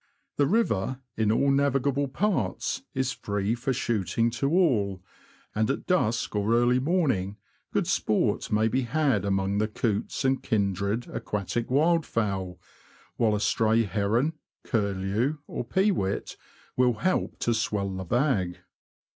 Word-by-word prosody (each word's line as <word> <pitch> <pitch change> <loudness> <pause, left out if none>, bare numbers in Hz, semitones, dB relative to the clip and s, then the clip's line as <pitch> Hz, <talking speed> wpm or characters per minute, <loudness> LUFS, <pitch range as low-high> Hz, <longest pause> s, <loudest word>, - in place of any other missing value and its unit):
The 145 - +3
river, 130 - +1 0.2
in 110 -1 +2
all 140 +5 +3
navigable 140 0 +1
parts, 135 - -1
is 130 0 0
free 100 +1 -2
for 125 +3 -2
shooting 115 -1 0
to 130 +4 -1
all, 105 - +2 0.5
and 110 +1 +1
at 135 - -2
dusk 120 - 0
or 105 +3 +2
early 120 +1 +3
morning 130 - 0 0.3
good - - +1
sport - - 0
may 110 +1 +3
be 130 +4 +1
had 130 -3 +1
among 95 0 0
the 110 - +1
coots 105 +4 -2
and 130 0 +2
kindred 100 +2 -1
aquatic 105 +3 -3
wildfowl; 115 - +1 0.6
while 110 -3 +2
a - - -1
stray 110 +2 +2
heron, 110 - 0 0.3
curlew, 100 +6 0
or - - -4
pewit, 175 - 0 0.4
will 125 -1 +3
help 185 +12 -1
to 120 - +2
swell 105 -3 -1
the 95 - -4
bag. 100 - 0
115 Hz, 135 wpm, -27 LUFS, 100-135 Hz, 0.6 s, The